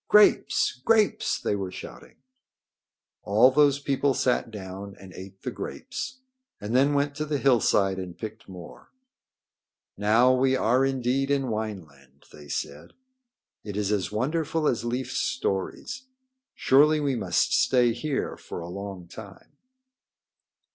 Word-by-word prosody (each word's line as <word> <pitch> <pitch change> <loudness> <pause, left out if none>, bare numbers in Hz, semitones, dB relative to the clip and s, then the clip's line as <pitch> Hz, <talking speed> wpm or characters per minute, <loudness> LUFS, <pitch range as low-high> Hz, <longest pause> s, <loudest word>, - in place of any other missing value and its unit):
"Grapes! 210 -10 +4
Grapes!" 220 -2 +2
they - - -1
were 95 -2 -3
shouting. - - -11 1.1
All 110 +6 +4
those 145 0 +4
people 140 -1 0
sat 125 -2 0
down 100 -1 -8
and 95 -2 -12
ate 95 +1 -11
the 125 - -3
grapes 255 - -6 0.4
and 105 +4 -3
then 140 +3 +4
went 140 0 +1
to 155 - -1
the 150 -1 -1
hillside 105 -8 +2
and 90 -2 -7
picked 110 -3 -8
more. 90 -2 -12 1.1
"Now 110 +5 +4
we 130 +1 +2
are 130 +1 +2
indeed 135 0 0
in 135 -2 0
Wineland," 80 - -7
they 75 -1 -13
said. 70 +1 -5 0.7
"It 105 -1 -6
is 105 -1 -1
as 100 -3 -1
wonderful 155 +7 -1
as 120 - 0
Leif's 130 +2 -2
stories. 180 - -3 0.5
Surely 150 +3 +4
we 140 -3 0
must 115 - 0
stay 120 -2 +3
here 135 +4 -3
for - - -8
a 85 - -7
long 95 -1 -7
time." 100 +2 -12
120 Hz, 135 wpm, -26 LUFS, 100-140 Hz, 1.1 s, Grapes